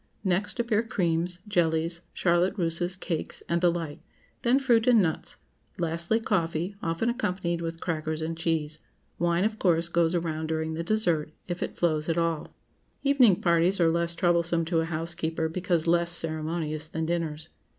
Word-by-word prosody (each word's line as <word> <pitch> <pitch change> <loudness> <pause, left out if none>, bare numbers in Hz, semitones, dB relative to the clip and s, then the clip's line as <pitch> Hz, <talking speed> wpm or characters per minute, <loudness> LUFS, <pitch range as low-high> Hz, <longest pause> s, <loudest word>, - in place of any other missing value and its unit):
Next 190 +5 0
appear 230 -2 +2
creams, 175 -5 0
jellies, 170 -3 +1
charlotte 180 +3 +1
russes, 175 +1 0
cakes, 175 -3 -4
and 170 0 0
the 175 -1 +5
like; 165 -4 -4 0.4
then 245 +2 +4
fruit 245 -4 +3
and 240 -3 +6
nuts; 165 -5 -1 0.4
lastly, 170 +6 0
coffee, 175 -3 -1
often 165 +7 -1
accompanied 180 -8 -1
with 165 0 -4
crackers 155 -2 -2
and 160 +1 -3
cheese. 160 -2 -1 0.4
Wine, 170 +1 +2
of 215 +1 -1
course, 170 -2 +2
goes 170 0 +2
around 160 -2 -2
during 160 0 -2
the 165 +1 -3
dessert—if 175 -3 -1
it - - -4
flows 155 -2 +1
at 165 - +1
all. 165 -2 0 0.6
Evening 260 -9 +5
parties 170 +2 +3
are 165 -1 +4
less 170 0 +1
troublesome 170 -1 +2
to 165 0 +1
a 160 - 0
housekeeper, 165 0 -2
because 175 -1 -1
less 170 0 +3
ceremonious 155 -1 -1
than 160 0 -2
dinners. 160 -2 -2
170 Hz, 160 wpm, -27 LUFS, 160-180 Hz, 0.6 s, and